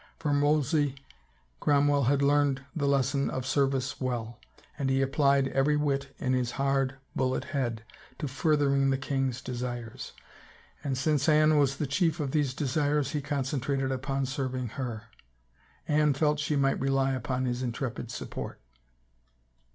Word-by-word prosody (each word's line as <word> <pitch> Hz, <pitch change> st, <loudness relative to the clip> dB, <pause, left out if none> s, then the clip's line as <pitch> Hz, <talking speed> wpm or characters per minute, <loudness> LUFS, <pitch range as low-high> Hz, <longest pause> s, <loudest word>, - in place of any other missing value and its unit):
From 145 Hz, -3 st, +1 dB
Wolsey, 145 Hz, -1 st, +2 dB, 0.6 s
Cromwell 145 Hz, -1 st, +3 dB
had 140 Hz, +2 st, +2 dB
learned 140 Hz, -1 st, +2 dB
the 145 Hz, -3 st, 0 dB
lesson 140 Hz, 0 st, +1 dB
of 130 Hz, -1 st, -3 dB
service 135 Hz, 0 st, 0 dB
well, 120 Hz, -2 st, -3 dB, 0.4 s
and 140 Hz, -3 st, -1 dB
he 135 Hz, 0 st, +2 dB
applied 140 Hz, 0 st, +3 dB
every 145 Hz, +3 st, +2 dB
wit 140 Hz, -2 st, -1 dB
in 130 Hz, -1 st, 0 dB
his 125 Hz, -2 st, 0 dB
hard, 135 Hz, -1 st, +1 dB, 0.2 s
bullet 130 Hz, -1 st, 0 dB
head 120 Hz, -6 st, -2 dB, 0.3 s
to 150 Hz, -, -3 dB
furthering 140 Hz, -1 st, +2 dB
the 135 Hz, -, +2 dB
king's 135 Hz, -2 st, -2 dB
desires. 120 Hz, -2 st, -5 dB, 0.7 s
And 135 Hz, -3 st, -1 dB
since 145 Hz, +1 st, +1 dB
Anne 155 Hz, 0 st, +5 dB
was 135 Hz, -1 st, +2 dB
the 150 Hz, -, -1 dB
chief 160 Hz, +4 st, +1 dB
of 140 Hz, -3 st, -2 dB
these 145 Hz, -4 st, 0 dB
desires 145 Hz, +1 st, 0 dB
he 150 Hz, -3 st, -1 dB
concentrated 140 Hz, -1 st, -1 dB
upon 135 Hz, +1 st, -1 dB
serving 130 Hz, -2 st, -3 dB
her. 120 Hz, -3 st, -5 dB, 0.8 s
Anne 150 Hz, -1 st, +3 dB
felt 150 Hz, +1 st, +2 dB
she 145 Hz, +1 st, 0 dB
might 135 Hz, -1 st, +2 dB
rely 135 Hz, 0 st, +1 dB
upon 130 Hz, 0 st, -2 dB
his 125 Hz, 0 st, -2 dB
intrepid 120 Hz, -1 st, -3 dB
support. 120 Hz, -, -6 dB
135 Hz, 145 wpm, -29 LUFS, 130-145 Hz, 0.8 s, Anne